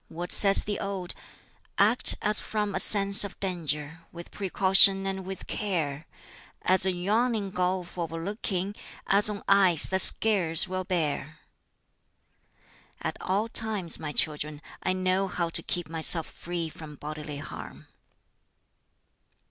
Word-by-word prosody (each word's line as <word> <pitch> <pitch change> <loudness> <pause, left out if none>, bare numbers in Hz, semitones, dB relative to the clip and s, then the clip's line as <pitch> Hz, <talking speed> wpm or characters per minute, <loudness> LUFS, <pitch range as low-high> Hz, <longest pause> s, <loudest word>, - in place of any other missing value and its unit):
What 175 +2 -8
says 195 -1 +5
the 205 -1 -4
Ode? 195 -3 -4 0.6
'Act 215 +5 +3
as 210 0 +3
from 210 -2 -4
a 190 - -2
sense 200 +1 +5
of 200 - -9
danger, 160 -4 -4
With 170 0 -12
precaution 195 0 +4
and 190 -1 -4
with 190 0 -8
care, 160 -7 -4 0.6
As 185 +1 +1
a - - +2
yawning 205 +3 -1
gulf 180 -1 -3
o'erlooking, 185 +4 -4 0.3
As 205 +2 +3
on 205 -1 -6
ice 190 -5 +4
that 190 0 +2
scarce 185 -8 +4
will 185 0 -5
bear,' 155 -4 -3 1.6
At - - -4
all 200 +4 -1
times, 215 -7 -2
my 150 -2 -6
children, 150 0 -1 0.2
I 185 - -1
know 185 +1 -1
how 175 -2 -3
to - - -1
keep 175 -1 -5
myself 160 0 +6
free 170 -1 -6
from 155 -1 -12
bodily 150 0 -8
harm." 145 - -10
185 Hz, 130 wpm, -26 LUFS, 165-200 Hz, 1.6 s, myself